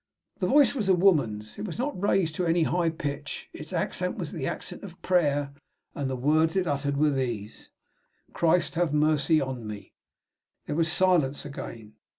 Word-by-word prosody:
The -, -, +1 dB
voice 290 Hz, -1 st, +5 dB
was 215 Hz, -8 st, -2 dB
a 190 Hz, -, +6 dB
woman's. 130 Hz, -, +1 dB
It -, -, -3 dB
was 175 Hz, -, -5 dB
not 250 Hz, -5 st, -3 dB
raised 190 Hz, -5 st, +2 dB
to 180 Hz, -, -1 dB
any 165 Hz, 0 st, +3 dB
high 170 Hz, +1 st, +1 dB
pitch; 145 Hz, -2 st, -5 dB
its -, -, -9 dB
accent -, -, -2 dB
was -, -, -4 dB
the -, -, -3 dB
accent -, -, -6 dB
of -, -, -10 dB
prayer, 145 Hz, -6 st, +1 dB, 0.4 s
and 140 Hz, -2 st, -3 dB
the 130 Hz, -, -2 dB
words 155 Hz, +6 st, +2 dB
it 190 Hz, -1 st, +2 dB
uttered 140 Hz, -2 st, -1 dB
were 150 Hz, +1 st, +3 dB
these: 120 Hz, -6 st, -4 dB, 0.6 s
"Christ, 170 Hz, +1 st, +2 dB
have 165 Hz, -3 st, 0 dB
mercy 155 Hz, +1 st, +3 dB
on 130 Hz, -5 st, -4 dB
me!" 105 Hz, -1 st, -8 dB, 0.7 s
There -, -, -3 dB
was 165 Hz, 0 st, +1 dB
silence 170 Hz, -7 st, +2 dB
again. 115 Hz, -6 st, -8 dB
155 Hz, 175 wpm, -27 LUFS, 140-175 Hz, 0.7 s, a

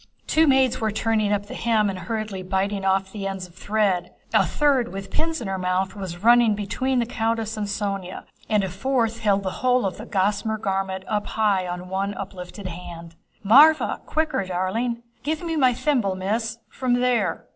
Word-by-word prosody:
Two 320 Hz, 0 st, +3 dB
maids 265 Hz, -3 st, +3 dB
were 220 Hz, -, +1 dB
turning 215 Hz, -1 st, 0 dB
up 205 Hz, 0 st, 0 dB
the 205 Hz, -, -9 dB
hem 220 Hz, -3 st, +1 dB
and 190 Hz, -2 st, -3 dB
hurriedly 215 Hz, +1 st, -4 dB
biting 195 Hz, +2 st, -1 dB
off 190 Hz, 0 st, +1 dB
the 200 Hz, -2 st, -4 dB
ends 195 Hz, -1 st, -4 dB
of 175 Hz, -, -17 dB
thread. 200 Hz, -3 st, 0 dB, 0.2 s
A -, -, +5 dB
third 275 Hz, -5 st, +2 dB
with 195 Hz, 0 st, -7 dB
pins 320 Hz, -2 st, -1 dB
in 225 Hz, -, -4 dB
her 190 Hz, -1 st, -2 dB
mouth 185 Hz, +1 st, -1 dB
was 185 Hz, -2 st, -7 dB
running 240 Hz, +1 st, +6 dB
about -, -, -4 dB
between 255 Hz, +6 st, -1 dB
the 240 Hz, -, +2 dB
countess 225 Hz, -1 st, -1 dB
and 210 Hz, -1 st, -3 dB
Sónya, 200 Hz, -3 st, -3 dB, 0.3 s
and 210 Hz, -2 st, +3 dB
a 190 Hz, -, -2 dB
fourth 230 Hz, +3 st, 0 dB
held 200 Hz, -2 st, +2 dB
the 190 Hz, -, -2 dB
whole 250 Hz, -2 st, +3 dB
of 190 Hz, -, -2 dB
the 220 Hz, -, -9 dB
gossamer 210 Hz, +2 st, 0 dB
garment 190 Hz, -2 st, -2 dB
up 210 Hz, -1 st, -1 dB
high 200 Hz, -4 st, +1 dB
on 180 Hz, +1 st, -5 dB
one 195 Hz, +2 st, -2 dB
uplifted 190 Hz, 0 st, -8 dB
hand. 170 Hz, -1 st, -8 dB, 0.3 s
"Mávra, 295 Hz, +9 st, +6 dB
quicker, 310 Hz, -9 st, 0 dB
darling!" 190 Hz, +7 st, -2 dB, 0.2 s
"Give 305 Hz, +6 st, -2 dB
me 330 Hz, -1 st, -2 dB
my 260 Hz, -5 st, +4 dB
thimble, 240 Hz, -6 st, 0 dB
Miss, 220 Hz, +5 st, -2 dB
from 255 Hz, -2 st, 0 dB
there..." 240 Hz, -8 st, +1 dB
205 Hz, 190 wpm, -24 LUFS, 190-235 Hz, 0.3 s, running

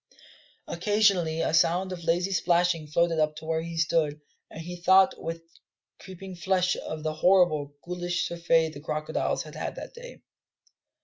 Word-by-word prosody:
Occasionally 180 Hz, -4 st, +1 dB
a -, -, -1 dB
sound 175 Hz, +3 st, +2 dB
of 175 Hz, -2 st, -7 dB
lazy 175 Hz, +3 st, +1 dB
splashing 175 Hz, -2 st, +1 dB
floated 165 Hz, +2 st, +1 dB
up 155 Hz, 0 st, +1 dB
to 155 Hz, +1 st, -10 dB
where 160 Hz, 0 st, -1 dB
he 165 Hz, 0 st, -7 dB
stood, 160 Hz, -2 st, +1 dB, 0.3 s
and -, -, -10 dB
he 175 Hz, +2 st, -7 dB
thought 190 Hz, +2 st, +5 dB
with 165 Hz, 0 st, -5 dB, 0.6 s
creeping 190 Hz, 0 st, -10 dB
flesh 180 Hz, +1 st, +1 dB
of 155 Hz, -1 st, -6 dB
the 155 Hz, 0 st, -1 dB
horrible, 155 Hz, -4 st, +2 dB
ghoulish 175 Hz, 0 st, -2 dB
surfeit 165 Hz, -2 st, +1 dB
the 140 Hz, -, -9 dB
crocodiles 155 Hz, +1 st, -2 dB
had -, -, -12 dB
had -, -, -5 dB
that -, -, -9 dB
day. -, -, -12 dB
170 Hz, 160 wpm, -27 LUFS, 160-180 Hz, 0.6 s, thought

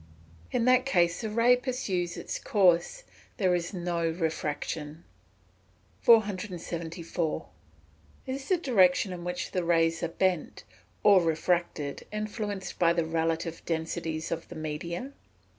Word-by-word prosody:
_ -, -, -21 dB, 0.5 s
In 235 Hz, -, +1 dB
that 255 Hz, 0 st, +5 dB
case 175 Hz, -9 st, +2 dB
the 220 Hz, -, -3 dB
ray 230 Hz, +3 st, +5 dB
pursues 200 Hz, -9 st, -2 dB
its -, -, -4 dB
course 190 Hz, -, +2 dB, 0.3 s
there 185 Hz, -5 st, +2 dB
is 175 Hz, -1 st, -1 dB
no 170 Hz, -3 st, -1 dB
refraction. 160 Hz, -1 st, -3 dB, 1.0 s
474. 175 Hz, -6 st, 0 dB, 0.8 s
_Is 270 Hz, +1 st, -4 dB
the 370 Hz, -, +3 dB
direction 195 Hz, -, +3 dB
in 175 Hz, -1 st, -7 dB
which 180 Hz, 0 st, -4 dB
the 180 Hz, -, -1 dB
rays 165 Hz, -1 st, +2 dB
are 170 Hz, -, 0 dB
bent, 180 Hz, -1 st, -1 dB, 0.4 s
or 200 Hz, -3 st, +7 dB
refracted, 165 Hz, -3 st, -1 dB
influenced 210 Hz, -2 st, -4 dB
by 170 Hz, -1 st, +4 dB
the 170 Hz, -1 st, 0 dB
relative 165 Hz, 0 st, -1 dB
densities 160 Hz, -1 st, -3 dB
of 165 Hz, 0 st, -3 dB
the -, -, -10 dB
media? 170 Hz, -, -4 dB
175 Hz, 125 wpm, -28 LUFS, 165-205 Hz, 1.0 s, or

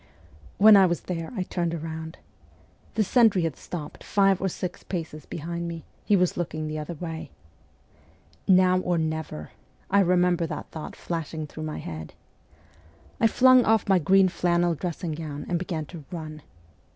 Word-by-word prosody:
When 215 Hz, +1 st, +8 dB
I 195 Hz, -2 st, +7 dB
was 170 Hz, -1 st, -1 dB
there 165 Hz, -3 st, -5 dB
I 185 Hz, -, 0 dB
turned 170 Hz, -2 st, -2 dB
round. 160 Hz, 0 st, -6 dB, 0.8 s
The 220 Hz, -, +3 dB
sentry 210 Hz, -4 st, +4 dB
had 160 Hz, -5 st, -1 dB
stopped 160 Hz, -4 st, -8 dB
five 195 Hz, -2 st, +3 dB
or 190 Hz, -, +1 dB
six 180 Hz, +1 st, -5 dB
paces 160 Hz, -4 st, -6 dB
behind 170 Hz, +2 st, -4 dB
me; 165 Hz, -1 st, -6 dB, 0.2 s
he 205 Hz, -, +3 dB
was 180 Hz, -2 st, +2 dB
looking 155 Hz, -2 st, -3 dB
the 155 Hz, 0 st, -4 dB
other 155 Hz, +3 st, -5 dB
way. 160 Hz, 0 st, -6 dB, 0.6 s
' 85 Hz, +1 st, -31 dB
Now 185 Hz, -1 st, +5 dB
or 180 Hz, -1 st, 0 dB
never! 160 Hz, -, -3 dB, 0.2 s
' -, -, -28 dB
I 200 Hz, -, +5 dB
remember 180 Hz, -2 st, +3 dB
that -, -, -6 dB
thought 155 Hz, -, -7 dB
flashing 160 Hz, -2 st, -4 dB
through 155 Hz, +1 st, -7 dB
my 155 Hz, -, -4 dB
head. 80 Hz, -1 st, -7 dB, 1.0 s
I 225 Hz, -, +5 dB
flung 255 Hz, +2 st, +6 dB
off 220 Hz, -1 st, +2 dB
my 190 Hz, -2 st, +4 dB
green 190 Hz, +4 st, +5 dB
flannel 175 Hz, 0 st, +1 dB
dressing 170 Hz, +2 st, -4 dB
gown 150 Hz, -2 st, -5 dB
and 175 Hz, -, 0 dB
began 165 Hz, -4 st, -3 dB
to 165 Hz, -4 st, -8 dB
run. 155 Hz, -3 st, -7 dB
170 Hz, 170 wpm, -26 LUFS, 160-185 Hz, 1.0 s, When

